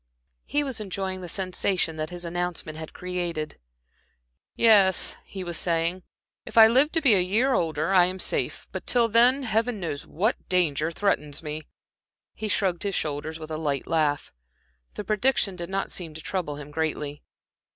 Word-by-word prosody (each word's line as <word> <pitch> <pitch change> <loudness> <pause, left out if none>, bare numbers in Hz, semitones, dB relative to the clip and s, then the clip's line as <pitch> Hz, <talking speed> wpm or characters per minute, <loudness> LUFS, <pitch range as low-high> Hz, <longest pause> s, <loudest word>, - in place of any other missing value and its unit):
He 290 0 +1
was 260 -6 -4
enjoying 190 -2 -3
the 175 - -7
sensation 185 -3 -1
that 155 0 -3
his 175 -1 -7
announcement 175 -2 -3
had 160 0 -7
created. 175 -4 -4 1.0
"Yes," 205 -5 +5
he 190 -2 -7
was 175 -2 -2
saying, 170 +1 0 0.4
"if - - -9
I 225 - +11
live 260 +7 +4
to 325 - +2
be 265 -7 +5
a 190 - +5
year 220 +9 +2
older, 160 -2 0
I 180 -2 +7
am 185 +1 -3
safe; - - 0
but - - -6
till 240 -2 +4
then 245 +5 +4
Heaven 225 -1 0
knows 155 -5 -4
what 210 +9 -1
danger 160 -4 +2
threatens 165 -5 -1
me!" 155 0 -4 0.7
He 220 - -5
shrugged 185 -4 +1
his 200 -1 -1
shoulders 155 +1 -3
with 160 -1 -9
a 155 - -2
light 145 -4 -1
laugh. 150 -3 0 0.6
The - - -4
prediction 215 -1 +1
did 175 0 -6
not 195 0 -2
seem 165 -4 -5
to 160 - -7
trouble 180 -7 -3
him 145 0 -9
greatly. 150 -2 -3
180 Hz, 170 wpm, -26 LUFS, 160-205 Hz, 1.0 s, I